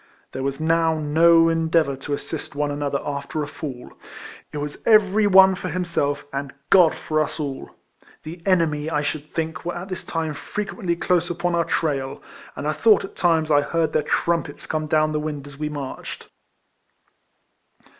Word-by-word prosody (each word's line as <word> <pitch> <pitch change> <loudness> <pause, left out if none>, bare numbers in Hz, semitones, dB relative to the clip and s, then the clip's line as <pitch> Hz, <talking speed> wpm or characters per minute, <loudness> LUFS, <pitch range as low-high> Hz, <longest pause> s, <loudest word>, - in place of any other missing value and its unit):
There 130 - -5
was 135 +1 -2
now 165 0 +2
no 165 +2 +5
endeavour 165 -3 +2
to 140 +2 -3
assist 145 -1 -7
one 145 0 0
another 145 -1 -2
after 145 +1 -3
a - - -5
fall; 140 -4 -8 0.6
it 150 - -6
was 145 0 -5
every 215 -1 +5
one 190 -1 +7
for 185 0 -5
himself, 170 -5 -1
and 140 0 -3 0.2
God 180 -4 +6
for 155 0 -2
us 155 +1 -1
all! 140 -3 -4 0.5
The 165 +3 -8
enemy, 160 -5 +1
I 150 -2 0
should 150 0 -4
think, 160 -1 -3
were 175 +1 -3
at 180 +3 -6
this 185 - -5
time 160 -2 -3
frequently 195 +2 -3
close 175 0 +1
upon 175 0 -1
our 170 -1 +2
trail; 140 -5 -1 0.4
and 145 +3 -4
I 155 - +1
thought 210 +7 +4
at - - -13
times 160 -3 +2
I 145 -1 +5
heard 160 +1 -1
their - - +3
trumpets 170 +3 -1
come 155 -1 -2
down 155 0 +2
the 150 - -1
wind 150 -2 -4
as 140 0 -12
we 150 0 -2
marched. 145 -3 -7
155 Hz, 175 wpm, -23 LUFS, 145-170 Hz, 0.6 s, one